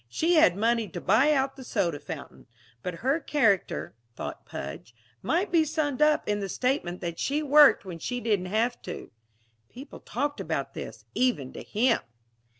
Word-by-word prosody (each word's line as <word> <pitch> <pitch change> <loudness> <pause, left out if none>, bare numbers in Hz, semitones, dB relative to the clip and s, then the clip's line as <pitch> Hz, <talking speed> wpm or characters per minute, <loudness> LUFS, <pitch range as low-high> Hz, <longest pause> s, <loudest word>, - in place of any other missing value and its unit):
She 335 +2 +1
had 315 - +5
money 230 +1 +1
to - - -6
buy 230 +10 +4
out 270 -2 +1
the 265 - -10
soda 180 - -1
fountain. - - -9 0.3
But 180 +5 -4
her 275 +5 +3
character, 200 - +1 0.2
thought - - -7
Pudge, 70 +11 -7 0.3
might 355 +4 0
be 335 -2 +5
summed 300 -3 -2
up 300 0 +3
in 210 0 0
the 195 -1 -4
statement 250 -7 -1
that 170 -2 -4
she 295 +3 0
worked 295 -5 +6
when 175 -3 -7
she 245 +8 -3
didn't 210 -6 0
have 230 +5 0
to - - -8 0.6
(people 270 +4 -11
talked 290 0 -3
about 155 -4 -3
this; 110 -1 -8
even 195 - 0
to - - -7
him!) 235 +3 +2
240 Hz, 170 wpm, -27 LUFS, 180-290 Hz, 0.6 s, worked